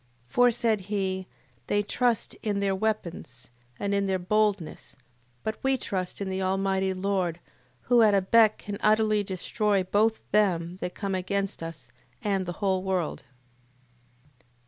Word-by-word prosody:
8:18. - - -27
For, 245 0 +6
said 230 -2 +1
he, 190 -1 -2 0.4
they 205 0 +1
trust 240 +1 0
in 205 -2 -1
their 200 -1 +1
weapons, 185 - -3 0.3
and 200 0 -1
in 200 0 +1
their 190 -1 +1
boldness: 190 - -1 0.5
but 220 - -3
we 265 0 +2
trust 185 -6 -3
in 200 - -3
the 190 0 -2
Almighty 190 0 +1
Lord, 185 -3 -1 0.4
who 245 -1 +4
at 210 -2 +5
a 195 - +4
beck 215 +3 +5
can 205 -1 -6
utterly 215 0 +3
destroy 200 +1 0
both 215 +4 +2
them 180 -4 +2
that 180 - -4
come 200 -2 -3
against 195 +1 -2
us, 160 -8 -8 0.3
and 195 -3 0
the 175 - -3
whole 190 -1 +2
world. 185 -7 -2
195 Hz, 150 wpm, -27 LUFS, 185-215 Hz, 0.5 s, For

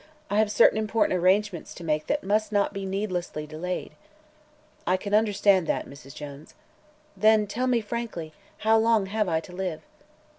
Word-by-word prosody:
"I 205 - +2
have 215 -1 +3
certain 220 +1 +5
important 215 -3 +1
arrangements 190 0 +1
to 175 - -9
make 155 -1 -1
that 290 - 0
must 210 +2 0
not 200 -1 +1
be 195 -1 -4
needlessly 185 -6 -3
delayed." 165 +4 -5 1.0
"I 185 - +3
can 200 +2 -6
understand 205 -4 +3
that, - - -1
Mrs. 140 -1 -13
Jones." 145 0 -10 0.6
"Then 215 +2 +4
tell 240 +5 -2
me 245 -2 +2
frankly, 210 -8 -5 0.2
how 220 +1 +3
long 225 -2 +3
have 210 0 -1
I 160 -1 +1
to 180 - -13
live?" 180 -3 -4
200 Hz, 170 wpm, -26 LUFS, 175-215 Hz, 1.0 s, certain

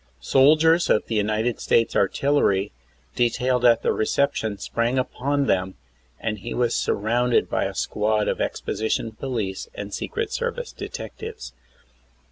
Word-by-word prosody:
Soldiers 155 - +4
of 105 - +3
the - - -5
United 110 +2 0
States 115 -1 +2
artillery 100 -2 +2 0.4
detailed 125 +1 +1
at 120 -2 +5
the - - +2
reception 110 -3 0
sprang 120 +5 -1
upon 140 +2 0
them, 95 -4 0 0.4
and 110 -2 -3
he 115 +5 -6
was 120 -1 +1
surrounded 120 +4 +1
by - - +1
a - - -4
squad 105 0 0
of'exposition 110 +1 -2
police 110 -5 -4
and 100 0 -6
secret 450 -1 -3
service 480 0 -3
detectives. 445 0 -8
120 Hz, 125 wpm, -24 LUFS, 105-140 Hz, 0.4 s, at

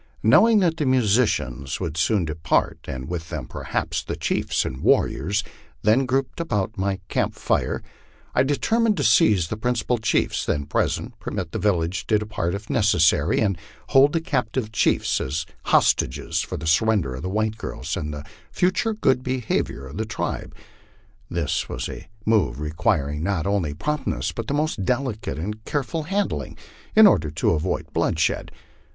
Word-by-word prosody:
Knowing 225 -1 +6
that 170 -5 +2
the 150 - 0
musicians 105 - +1
would 85 -5 -3
soon 90 +3 +2
depart, 80 -1 0
and 65 0 -5
with 80 -2 -5
them - - -4
perhaps - - -3
the - - -4
chiefs - - 0
and 65 0 -5
warriors 100 +9 +2 0.4
then 120 +5 +3
grouped 135 +3 -1
about 110 - -1
my 95 0 -1
camp - - -1
fire, - - -1 0.5
I - - +4
determined 215 - +2
to 145 - 0
seize 105 -5 +4
the 110 - -3
principal 120 +1 0
chiefs 110 - +1
then 70 -1 -1
present, - - -1
permit - - -4
the - - -3
village 90 -3 0
to 110 - +4
depart 105 -4 -2
if 100 +2 -7
necessa 85 -8 +3
ry, - - +2
and 100 -5 0 0.3
hold 135 +2 +5
the 165 - +1
captured 125 -6 -2
chiefs - - +2
as 75 +4 -2 0.2
hostages 60 - +2
for - - -5
the - - -6
surrender 85 -3 +2
of 65 - -6
the 90 - -3
white 110 +2 -1
girls 70 +6 -4
and 75 -6 -3
the 75 0 -7 0.3
future 185 +5 +1
good 130 - +2
behavior 125 - -2
of 70 +6 -9
the 110 - -1
tribe. 110 - -4 0.7
This 85 -4 -1
was - - -3
a - - -8 0.2
move 100 - +2
requiring 75 -1 0
not 90 -2 -1
only 95 -8 0
promptness 150 - -2
but 115 +2 -5
most 145 -8 0
delicate 125 - -2
and 105 +7 -5
careful 145 +5 -2
handling, 200 +1 -2 0.4
in 220 0 +9
order 90 - +4
to 75 - +1
avoid 85 +3 -2
bloodshed. - - 0
105 Hz, 165 wpm, -23 LUFS, 80-130 Hz, 0.7 s, in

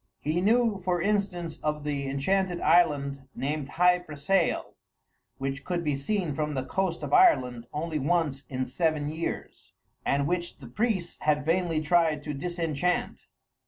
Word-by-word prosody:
He 160 +4 -1
knew, 220 -1 +3
for 180 -1 +1
instance, 180 -4 -1
of 150 -1 -2
the 140 -2 -2
enchanted 180 +7 0
island 140 -5 +2
named 145 0 -2
Hy 180 +1 +4
Brasail, 170 +2 0 0.6
which 135 +1 -3
could 175 +1 -2
be 150 -3 0
seen 165 +3 -1
from 150 0 -2
the 130 -1 -2
coast 190 0 -1
of - - -4
Ireland 125 - +4
only 155 +1 -2
once 145 -2 0
in 130 -1 -2
seven 150 +2 0
years, 160 +2 -5 0.3
and 140 0 +1
which 175 +2 -2
the 140 - -12
priests 190 - -2
had 150 -2 +1
vainly 165 -1 +1
tried 155 -2 +2
to 150 - -4
disenchant. 170 +2 -2
160 Hz, 150 wpm, -28 LUFS, 140-180 Hz, 0.6 s, Hy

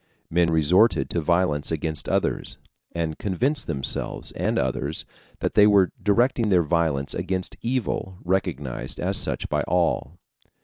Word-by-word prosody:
Men 85 +1 +3
resorted 85 +8 +3
to 85 - 0
violence 85 -3 +1
against 80 -1 -2
others, - - -1 0.3
and 80 -2 -3
convinced 130 - -1
themselves 70 -4 -2
and - - -1
others 65 +4 -2 0.4
that - - -1
they 105 0 +6
were 100 -3 +4
directing 115 +2 +2
their 90 -3 +4
violence 80 -4 0
against 95 -1 -2
evil 115 -6 -2
recognized 75 -8 -2
as - - 0
such - - -2
by - - 0
all. 85 -2 0
85 Hz, 135 wpm, -24 LUFS, 80-100 Hz, 0.4 s, they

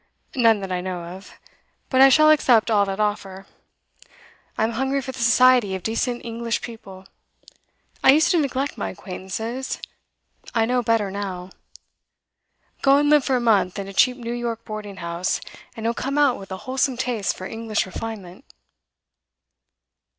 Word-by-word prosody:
'None 225 -5 +4
that 190 -1 -5
I 180 -1 -1
know 180 -1 -5
of. 185 +3 -10 0.6
But 260 -1 +4
I 270 - +9
shall 310 +3 +6
accept 240 -7 +4
all 205 -2 +4
that 195 +1 -4
offer. 195 -2 -2 1.1
I'm 220 +1 +1
hungry 265 +4 -1
for 265 -1 -5
the 260 - -10
society 235 -3 +4
of 185 - -7
decent 240 +2 -2
English 230 0 -3
people. 195 -5 -10 1.0
I - - +8
used 315 +3 +3
to 350 - +3
neglect 275 -3 -2
my - - -2
acquaintances; 220 +8 -5 0.8
I 225 -1 +3
know 250 +1 +1
better 225 -4 +1
now. 190 -2 -5 1.3
Go 275 0 +5
and 290 +1 +2
live 300 -2 +5
for 265 - +1
a - - +2
month 215 -6 +2
in 200 -1 -5
a 195 - -8
cheap 250 +5 +3
New 235 -1 -5
York 235 -1 -4
boarding 210 -2 -7
house, 170 +2 -1 0.4
and 225 - -6
you'll 230 - +1
come 275 +4 -3
out 285 -4 +3
with 195 -1 -11
a 190 - -4
wholesome 260 0 0
taste 240 -6 -2
for 185 - -7
English 225 +1 -2
refinement. 190 -2 -7
225 Hz, 165 wpm, -23 LUFS, 195-255 Hz, 1.3 s, I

